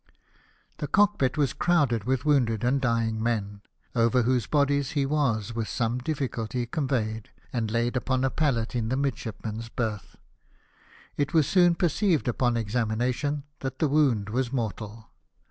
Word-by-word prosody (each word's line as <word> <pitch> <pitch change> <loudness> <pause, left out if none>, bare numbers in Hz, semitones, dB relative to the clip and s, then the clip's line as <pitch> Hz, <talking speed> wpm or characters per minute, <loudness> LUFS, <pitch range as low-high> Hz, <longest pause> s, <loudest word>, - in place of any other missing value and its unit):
The 150 - -2
cockpit 195 -8 +2
was 140 -4 +1
crowded 140 -11 +1
with 130 +2 0
wounded 120 -7 +2
and 130 +3 +2
dymg 115 -3 0
men, 105 -3 -2 0.3
over 120 +1 +3
whose 125 -2 +1
bodies 140 0 +1
he 140 -3 +1
was 125 -7 0
with 115 -2 -2
some 120 +1 -1
difficulty 125 -4 -2
conveyed, 115 -5 -2 0.2
and 115 -3 -1
laid 120 +3 0
upon 130 +1 0
a 135 - +1
pallet 125 -7 0
in 115 -2 -1
the 130 - 0
midshipmen's 115 -4 -3
berth. 110 -4 -4 1.0
It 145 +4 -1
was 155 -3 +5
soon 175 0 +4
perceived 175 -2 +1
upon 120 0 +1
examination 120 +6 -1 0.2
that 130 -1 -4
the 155 - +2
wound 135 -9 +2
was 125 +1 -1
mortal. 110 -2 -4
125 Hz, 145 wpm, -27 LUFS, 115-140 Hz, 1.0 s, was